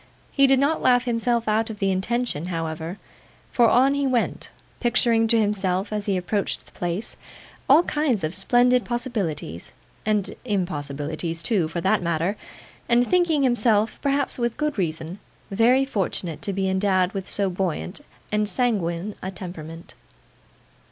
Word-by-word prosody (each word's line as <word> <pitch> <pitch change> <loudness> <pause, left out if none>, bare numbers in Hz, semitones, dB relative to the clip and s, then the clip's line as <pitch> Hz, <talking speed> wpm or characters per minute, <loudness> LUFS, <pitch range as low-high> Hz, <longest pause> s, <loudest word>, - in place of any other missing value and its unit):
He 275 -1 +4
did 270 0 +5
not 285 +4 +1
laugh 245 0 +4
himself 235 -1 0
out 220 +1 +1
of 220 - -6
the 195 -1 +1
intention, 190 -3 -1
however, 165 +1 -4 0.5
for 235 -2 +4
on 265 +3 +4
he 280 -1 0
went: 245 -3 -1 0.3
picturing 235 -2 +2
to 230 0 +3
himself, 200 -1 0
as 210 -1 -2
he 195 -2 +1
approached 195 +3 -2
the - - -20
place, 175 +5 -4 0.5
all 300 +6 +7
kinds 295 - 0
of 155 +2 -1
splendid 245 +5 +3
possibilities, 200 - -3 0.3
and 210 -2 +1
impossibilities 165 - -3
too, 195 -9 +1
for 170 +2 -4
that 190 +4 +2
matter, 170 +3 0 0.5
and 240 +1 +4
thinking 345 -5 +2
himself, 225 -4 +2
perhaps 280 -2 0
with 235 -1 -1
good 300 -1 -1
reason, 165 +1 -3 0.3
very 245 +6 +4
fortunate 185 - -3
to 205 - -2
be 195 0 -1
endowed 190 -1 +2
with 195 -2 -5
so 200 -1 0
buoyant 185 - -3 0.3
and 210 0 +1
sanguine 205 -6 0
a 190 - -4
temperament. 170 -3 -9
205 Hz, 150 wpm, -24 LUFS, 180-245 Hz, 0.5 s, all